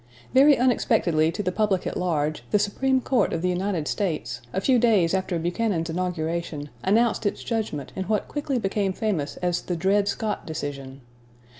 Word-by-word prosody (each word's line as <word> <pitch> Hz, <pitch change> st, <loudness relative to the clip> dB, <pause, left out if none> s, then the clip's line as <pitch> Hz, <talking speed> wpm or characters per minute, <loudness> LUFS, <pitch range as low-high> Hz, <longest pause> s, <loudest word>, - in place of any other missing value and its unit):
Very 280 Hz, +2 st, +7 dB
unexpectedly 200 Hz, -10 st, +2 dB
to 205 Hz, -, -4 dB
the 185 Hz, -, 0 dB
public 200 Hz, -2 st, 0 dB
at -, -, -3 dB
large, 155 Hz, -4 st, -1 dB
the 210 Hz, -, +3 dB
Supreme 260 Hz, +6 st, +1 dB
Court 245 Hz, -5 st, +1 dB
of 165 Hz, -, -2 dB
the 180 Hz, -, +2 dB
United 180 Hz, -3 st, -1 dB
States, 150 Hz, -, -2 dB
a -, -, -1 dB
few 250 Hz, +4 st, +3 dB
days 210 Hz, -8 st, +3 dB
after 190 Hz, -2 st, 0 dB
Buchanan's 175 Hz, 0 st, -1 dB
inauguration, 165 Hz, -3 st, -3 dB
announced 225 Hz, +2 st, +2 dB
its -, -, -3 dB
judgment 215 Hz, -, -3 dB
in 190 Hz, -, -3 dB
what 215 Hz, +1 st, 0 dB
quickly 290 Hz, -3 st, -2 dB
became 195 Hz, -3 st, 0 dB
famous 185 Hz, -9 st, -2 dB
as 175 Hz, -1 st, +1 dB
the 180 Hz, -, -3 dB
Dred 195 Hz, +4 st, +2 dB
Scott 215 Hz, +1 st, -2 dB
decision. 140 Hz, -3 st, -6 dB
190 Hz, 170 wpm, -25 LUFS, 165-215 Hz, -, Very